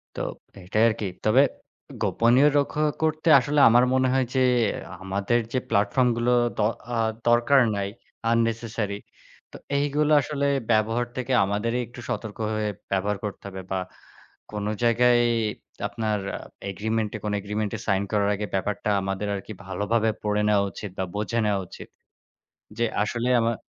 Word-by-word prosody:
তো - - -5 0.4
এটাই 110 +5 +2
আরকি। 110 -2 -2 0.2
তবে 110 +5 +5 0.6
গোপনীয় 120 +5 +4
রক্ষা 150 +2 0 0.2
করতে 155 +1 0
আসলে 145 +3 +1
আমার 120 +2 +5
মনে 130 0 +3
হয়, 130 -1 +3
যে 130 - +2 0.6
আমাদের 100 +5 0
যে 130 - +1
প্ল্যাটফর্ম 105 +5 +2
গুলো 120 +1 +1 0.2
দ - - -16 0.4
আ - - 0 0.3
দরকার 120 +4 +5 0.2
নাই। 100 0 -1 0.4
unnecessary। 115 -2 0 0.5
তো - - -10 0.2
এইগুলো 145 +1 +1
আসলে 140 -1 -2 0.2
ব্যবহার 115 +2 +2
থেকে 130 0 -2
আমাদেরই 105 +5 -1
একটু 120 +1 -11
সতর্ক 110 -2 -4 0.2
হয়ে, 110 0 -1 0.2
ব্যবহার 100 +2 0
করতে 105 - -5
হবে। 95 -1 -7
বা 95 - 0 0.7
কোন 105 -1 -3 0.2
জায়গায় 120 +1 +4 0.7
আপনার 110 -2 -2 0.5
এগ্রিমেন্টে 110 +2 -2
কোন 105 - -1
এগ্রিমেন্টে 105 +2 -3
সাইন 100 -2 +2
করার 100 -1 +2
আগে, 105 +1 -3
ব্যাপারটা 100 +2 -2
আমাদের 95 +1 -3
আরকি 100 +2 -6
ভালোভাবে 110 +3 0
পড়ে 105 0 +1
নেয়া 105 -1 +4
উচিত 100 +1 -7
বা 95 - 0
বোঝে 110 +3 -1
নেয়া 100 -1 +1
উচিত। - - -11 0.9
যে 120 - +2 0.2
আসলে 115 +3 -1
আমার 115 0 +1
110 Hz, 145 wpm, -25 LUFS, 105-120 Hz, 0.9 s, তবে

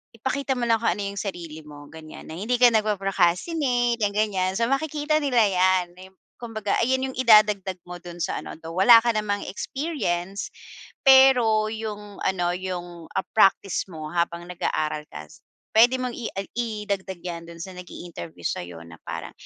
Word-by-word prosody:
Ipakita 265 +3 -2
mo 240 - -1
lang 225 -1 +4
kung 230 - +2
ano 205 +1 -5
yung 200 - -5
sarili 170 -6 -6
mo 145 -1 -12
ganyan 160 -1 -11
na - - -7
hindi 235 +6 0
ka 245 -1 +6
nagpo-procastinate 220 - +1
yang 205 0 0
gan'yan. 190 -3 +1
So, 230 - +2
makikita 305 +2 0
nila 250 -5 +3
'yan. 185 -1 +3
Ayon, 190 +1 -14 0.3
kumbaga 220 -3 -3
ayan 260 +2 +1
yung - - -13
idadagdag 210 -5 +5
mo 180 0 -7
dun 175 0 -10
sa - - -2
ano - - -8
though 165 +1 -7
wala 215 +5 +8
ka 235 -1 +2
namang 205 -1 -1
experience. 200 - -3 0.6
Pero 250 -5 +6
yung 210 -2 -6
ano, 175 -2 +1
yung, 175 -2 -6
ah, - - -1
practice 195 -2 +3
mo 155 -2 -7
habang 170 0 -1
nag-aaral 155 -3 -2
ka 75 +1 -9
s - - -18 0.3
puwede 245 +3 +5
mong 250 -2 -4
i 235 - -4
ag 195 0 -5
idagdag 205 -5 -3
'yan 170 -2 -6
dun 170 0 -10
sa 190 - -7
nag-i-interview 165 - -9
sa'yo 85 -1 -4
na 85 0 -13
parang, - - -6
200 Hz, 175 wpm, -24 LUFS, 175-235 Hz, 0.6 s, wala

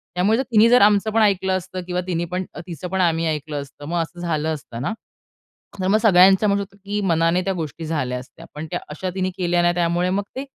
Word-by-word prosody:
त्यामुळे 215 +8 +2
तिनी 230 -2 +4
जर 245 +1 +6
आमचं 205 +1 +4
पण 225 +1 +2
ऐकलं 190 -3 +2
असतं 185 0 -6
किंवा 180 0 -1
तिनी 175 -1 -1
पण 180 +2 -3
तिचं 170 -1 -7
पण 190 +1 0
आम्ही 165 -2 +2
ऐकलं 150 -1 -3
असतं 140 +1 -12
मग 170 +1 0
असं 165 +2 -7
झालं 160 -2 -1
असतं 120 -6 -8
ना. 145 - -2 0.9
तर 185 - -1
मग 210 +2 +4
सगळ्यांचं 190 -1 +6
म्हणू 200 0 +2
शकतो, 200 0 -12
की 205 +1 -2
मनाने 165 -2 +2
त्या 195 - 0
गोष्टी 165 -1 -5
झाल्या 130 -6 -2
असत्या. 125 - -13
पण 150 +2 -6
त्या - - -2
अशा 180 +5 -4
तिने 185 -1 -1
केल्या 175 -1 +1
ना 175 0 +3
त्यामुळे 175 +1 +1
मग 195 +2 0
ते 265 - -3
180 Hz, 225 wpm, -21 LUFS, 165-195 Hz, 0.9 s, जर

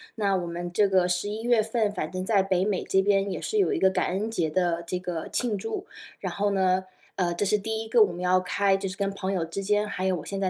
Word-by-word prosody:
那 200 -4 +1
我 175 -2 -2
们 175 +1 -5
这 205 +3 +3
个 185 -2 +3
十 180 +2 -1
一 215 +2 -4
月 240 -1 +3
份 220 -1 0
反 180 -6 -3
正 185 0 -3
在 200 -1 +3
北 190 -1 +1
美 200 -3 -1
这 190 - +3
边 195 0 +2
也 - - -3
是 435 - -2
有 400 +1 +3
一 - - -1
个 190 - +5
感 - - 0
恩 205 +5 -2
节 170 -8 0
的 170 0 0
这 180 - -1
个 180 -3 -4
庆 235 -5 -1
祝。 400 - -4 0.3
然 - - -4
后 205 0 0
呢， 185 -1 +2 0.3
呃， 180 -2 0
这 205 - 0
是 210 +2 +3
第 220 +2 -3
一 - - -9
个 230 +1 +4
我 200 - 0
们 175 - -8
要 180 0 +3
开 195 +2 +1
就 195 - -3
是 185 - -7
跟 200 -1 -1
朋 195 -1 -3
友 180 -3 0
之 165 +4 -5
间 210 +1 +1
还 190 -2 -3
有 190 - +2
我 160 - -7
现 195 - -4
在 190 - +1
195 Hz, 310 characters per minute, -26 LUFS, 180-210 Hz, 0.3 s, 个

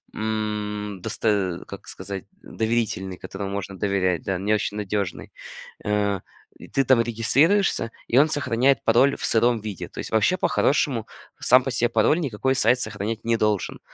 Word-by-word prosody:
м, 105 -2 -3
досто 100 -4 -1
как - - -10
сказать, 100 -2 -7 0.2
доверительный, 110 -5 -2
которому 95 +1 -6
можно 100 -1 -5
доверять, 95 -3 0
да, 95 -2 -1
не 105 +3 +1
очень 105 0 -1
надежный. 100 -3 -3 0.5
А, 105 -2 0 0.4
и - - -11
ты 135 - +1
там 125 -2 +5
регистрируешься, 120 - +2 0.2
и, 120 - +2
он 150 +2 +5
сохраняет 135 -3 +1
пароль 130 +5 +4
в - - -4
сыром 120 +1 +2
виде. 105 -4 -6
То - - -11
есть - - -5
вообще, 110 - +3
по-хорошему, 140 -8 +1 0.3
сам 125 +1 +5
по 135 - -2
себе 120 -1 +1
пароль 115 +8 +3
никакой 130 -3 0
сайт 125 +1 +3
сохранять 110 +1 -4
не 115 0 +2
должен. 105 -3 0
110 Hz, 160 wpm, -24 LUFS, 100-120 Hz, 0.5 s, там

